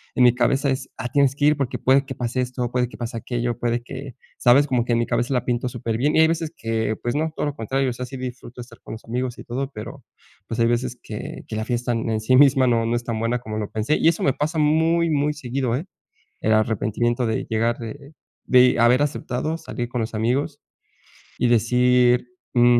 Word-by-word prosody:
en 125 Hz, -, +4 dB
mi 120 Hz, -, +6 dB
cabeza 135 Hz, +3 st, +1 dB
es: 130 Hz, -, -3 dB
"Ah, 125 Hz, -, -4 dB
tienes 140 Hz, 0 st, +2 dB
que 145 Hz, -, 0 dB
ir 150 Hz, 0 st, +4 dB
porque 135 Hz, -4 st, -2 dB
puede 135 Hz, +1 st, +3 dB
que 135 Hz, -, -6 dB
pase 125 Hz, +1 st, -2 dB
esto, 125 Hz, -1 st, -3 dB
puede 125 Hz, -1 st, 0 dB
que -, -, -12 dB
pase 120 Hz, 0 st, -5 dB
aquello, 120 Hz, 0 st, -2 dB
puede 120 Hz, 0 st, 0 dB
que" 130 Hz, +1 st, -8 dB, 0.2 s
¿sabes?, 130 Hz, +4 st, +5 dB
como 125 Hz, -3 st, +1 dB
que 120 Hz, -, 0 dB
en 115 Hz, -, +2 dB
mi 120 Hz, -, +1 dB
cabeza 120 Hz, +2 st, -1 dB
la 125 Hz, -, 0 dB
pinto 120 Hz, 0 st, -1 dB
superbien 120 Hz, +4 st, -1 dB
y -, -, +4 dB
hay 160 Hz, -, +6 dB
veces 165 Hz, -1 st, -2 dB
que 110 Hz, -1 st, -1 dB
pues, 120 Hz, -, -1 dB
no, 155 Hz, +1 st, 0 dB
todo -, -, -2 dB
lo 145 Hz, -, -4 dB
contrario, 130 Hz, +4 st, -1 dB
o -, -, -5 dB
sea, 125 Hz, +1 st, -5 dB
sí 135 Hz, +1 st, -8 dB
disfruto 125 Hz, -1 st, -7 dB
de -, -, -6 dB
estar 120 Hz, -1 st, -16 dB
con -, -, -9 dB
los 110 Hz, -, -10 dB
amigos 125 Hz, +1 st, -3 dB
y -, -, -9 dB
todo, 135 Hz, +3 st, -4 dB
pero 115 Hz, +3 st, -9 dB, 0.4 s
pues 115 Hz, -, -4 dB
hay 115 Hz, -, +4 dB
veces 120 Hz, +1 st, 0 dB
que -, -, -7 dB
que -, -, -5 dB
la 110 Hz, -, -2 dB
fiesta 120 Hz, 0 st, -1 dB
en 115 Hz, -1 st, -1 dB
sí 130 Hz, +4 st, +3 dB
misma 135 Hz, -1 st, +6 dB
no, 115 Hz, -2 st, +2 dB
no 120 Hz, -, 0 dB
es 120 Hz, -, -2 dB
tan 115 Hz, -2 st, -3 dB
buena 115 Hz, +2 st, 0 dB
como 110 Hz, -2 st, -6 dB
lo 105 Hz, -, -4 dB
pensé, 110 Hz, +8 st, 0 dB
y -, -, +2 dB
eso 165 Hz, 0 st, +2 dB
me 135 Hz, -, +3 dB
pasa 155 Hz, +4 st, -2 dB
muy, 160 Hz, +2 st, +3 dB
muy 145 Hz, 0 st, +1 dB
seguido, 130 Hz, -3 st, -2 dB
¿eh?, 150 Hz, +8 st, -3 dB, 0.5 s
el 110 Hz, -, +1 dB
arrepentimiento 110 Hz, +2 st, +1 dB
de 110 Hz, -1 st, -1 dB
llegar, 115 Hz, +1 st, +1 dB
de 140 Hz, +6 st, -9 dB, 0.3 s
de 125 Hz, 0 st, +5 dB
haber 125 Hz, +4 st, +5 dB
aceptado 150 Hz, +2 st, -2 dB
salir 120 Hz, -6 st, -5 dB
con 120 Hz, 0 st, -3 dB
los 110 Hz, 0 st, -4 dB
amigos, 130 Hz, +7 st, -1 dB, 0.8 s
y 125 Hz, -, +2 dB
decir: 125 Hz, +1 st, +3 dB, 0.3 s
"Mm, 120 Hz, 0 st, +5 dB
125 Hz, 235 wpm, -23 LUFS, 115-135 Hz, 0.8 s, mi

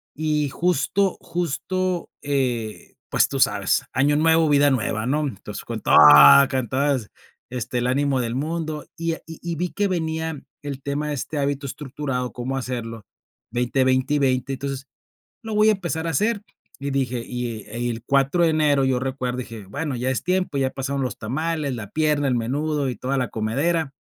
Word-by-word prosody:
y 150 Hz, -1 st, 0 dB
justo 180 Hz, +4 st, +1 dB
justo, 175 Hz, +2 st, -2 dB
eh, 125 Hz, -6 st, -2 dB, 0.2 s
pues, -, -, +3 dB
tú -, -, -3 dB
sabes -, -, +2 dB
"Año 145 Hz, +3 st, +3 dB
nuevo, 160 Hz, +1 st, +4 dB
vida 145 Hz, 0 st, +5 dB
nueva", 110 Hz, -3 st, -1 dB
¿no? 150 Hz, +2 st, +1 dB
Entonces, 100 Hz, -, -7 dB
con -, -, -4 dB
todo -, -, +3 dB, 0.5 s
cantadas, 130 Hz, -1 st, 0 dB, 0.4 s
este, 125 Hz, 0 st, -3 dB
el 120 Hz, -, 0 dB
ánimo 135 Hz, 0 st, +1 dB
del 115 Hz, 0 st, -2 dB
mundo. 155 Hz, +1 st, -3 dB
Y, 165 Hz, 0 st, -1 dB
ah, -, -, -5 dB
y 160 Hz, -, -9 dB
y 170 Hz, -1 st, -3 dB
vi 180 Hz, +3 st, -2 dB
que 205 Hz, 0 st, 0 dB
venía 160 Hz, -3 st, -2 dB, 0.2 s
el 140 Hz, -2 st, -5 dB
tema 145 Hz, +2 st, -2 dB
de 145 Hz, -, -1 dB
este 150 Hz, +3 st, -4 dB
hábito 140 Hz, 0 st, -1 dB
estructurado, 135 Hz, -2 st, -4 dB
cómo 125 Hz, +2 st, -3 dB
hacerlo, 115 Hz, -4 st, -5 dB, 0.5 s
20, 125 Hz, +2 st, +1 dB
20 130 Hz, +2 st, +2 dB
y -, -, +2 dB
20, 130 Hz, -1 st, +1 dB
entonces, 135 Hz, 0 st, -4 dB, 0.6 s
lo 220 Hz, -1 st, -5 dB
voy 210 Hz, +1 st, +5 dB
a -, -, +5 dB
empezar 170 Hz, -4 st, -3 dB
a -, -, 0 dB
hacer, 205 Hz, -, +1 dB, 0.4 s
y 140 Hz, 0 st, -3 dB
dije, 130 Hz, -3 st, -1 dB
y 120 Hz, -3 st, -4 dB
el 120 Hz, +2 st, -3 dB
el 115 Hz, -, -11 dB
4 140 Hz, +6 st, +2 dB
de 165 Hz, -, +4 dB
enero 150 Hz, -3 st, +3 dB
yo 130 Hz, -1 st, +2 dB
recuerdo, 130 Hz, -1 st, -3 dB
dije: 115 Hz, -4 st, -7 dB
"Bueno, 140 Hz, +6 st, -3 dB
ya 125 Hz, +2 st, -1 dB
es 130 Hz, -, -1 dB
tiempo, 180 Hz, -5 st, 0 dB
ya 135 Hz, -1 st, +2 dB
pasaron 140 Hz, +1 st, -3 dB
los 125 Hz, -, -3 dB
tamales, 145 Hz, +4 st, -2 dB
la 110 Hz, -4 st, -6 dB
pierna, 150 Hz, -2 st, +1 dB
el 125 Hz, -, +2 dB
menudo, 145 Hz, +4 st, -1 dB
y 120 Hz, -, -6 dB
toda 130 Hz, +5 st, -2 dB
la 125 Hz, -, 0 dB
comedera", 140 Hz, +7 st, -1 dB
140 Hz, 185 wpm, -23 LUFS, 125-155 Hz, 0.6 s, vida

